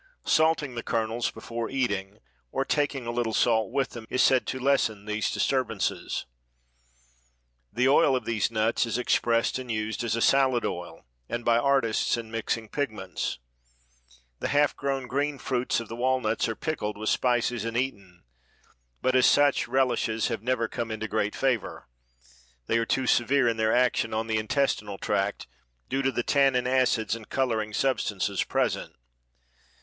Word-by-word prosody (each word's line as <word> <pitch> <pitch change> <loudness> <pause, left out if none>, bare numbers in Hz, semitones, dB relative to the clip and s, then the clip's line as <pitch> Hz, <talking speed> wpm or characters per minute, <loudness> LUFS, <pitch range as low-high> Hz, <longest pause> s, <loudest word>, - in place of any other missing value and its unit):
Salting 155 -4 +2
the 120 - -4
kernels 115 +1 -1
before 115 0 -5
eating 105 -7 -2 0.3
or - - -1
taking 145 -3 0
a 120 - -2
little 120 -2 -1
salt 110 -2 +2
with 135 -2 0
them 115 -2 -9
is 130 - +2
said 130 -2 +3
to 130 - -2
lessen 125 -6 +1
these 105 0 -1
disturbances. 125 -7 -1 1.5
The 125 +2 +1
oil 135 -1 +5
of 130 - -2
these 115 -3 0
nuts 115 +1 +1
is 115 - -1
expressed 120 0 +1
and 125 -2 -6
used 110 0 -2
as 115 -1 0
a - - -1
salad 130 -2 +3
oil 85 -2 -5 0.2
and 120 0 -4
by 115 0 +4
artists 125 -4 +2
in 115 -1 -7
mixing 115 0 -2
pigments. 110 -8 -3 1.0
The - - -2
half 145 0 +2
grown 135 -1 -2
green 140 +3 -1
fruits 125 -2 -1
of 115 - -7
the 115 - -7
walnuts 120 -3 0
are 115 - -2
pickled 105 -10 -3
with 110 +1 -2
spices 120 -2 +1
and 115 0 -3
eaten, 100 -9 -4 0.8
but 130 - +2
as 130 - +6
such 145 -1 +3
relishes 120 -3 +1
have 115 -3 -3
never 120 -1 0
come 115 +1 -4
into 110 0 -4
great 105 -1 -1
favor. 130 -6 -1 0.8
They 115 - +1
are 115 - -1
too 130 - 0
severe 125 +2 +3
in 115 -1 +1
their 110 0 +2
action 120 -2 +2
on 110 +1 -1
the 110 -1 0
intestinal 110 -4 -1
tract, 100 0 -1 0.4
due 135 - 0
to 135 0 +1
the 120 - -1
tannin, 135 -3 +3
acids 125 -4 +2
and 110 -2 -11
coloring 115 -5 0
substances 105 -5 0
present. - - -1
120 Hz, 165 wpm, -27 LUFS, 110-130 Hz, 1.5 s, as